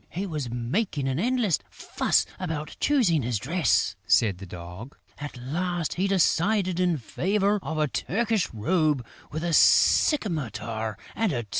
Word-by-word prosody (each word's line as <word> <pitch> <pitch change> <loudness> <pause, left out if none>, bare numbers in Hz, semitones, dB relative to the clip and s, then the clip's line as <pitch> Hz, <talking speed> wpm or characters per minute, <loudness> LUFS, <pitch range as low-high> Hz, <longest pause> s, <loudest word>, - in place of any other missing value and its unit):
"He 190 +4 -4
was 150 -9 -4
making 135 - -2
an 135 +2 -1
endless 235 - +1
fuss - - 0
about 160 -4 -4
choosing 225 - +3
his 120 -2 -1
dress," 150 - +1
said 100 -5 +3
the 95 - -9
Dog. 90 +9 -9 0.2
"At 145 -3 -7
last, 170 +6 -2
he 190 +3 0
decided 190 0 +2
in 180 -3 +2
favour 200 - 0
of 160 - -4
a 155 -1 +2
Turkish 220 - -1
robe, 145 - +1 0.3
with 155 +2 -4
a 170 -1 -1
scimitar 115 - +2 0.2
and 225 -4 +1
a 120 -4 -2
turban." 105 - -21
160 Hz, 150 wpm, -26 LUFS, 120-190 Hz, 0.3 s, choosing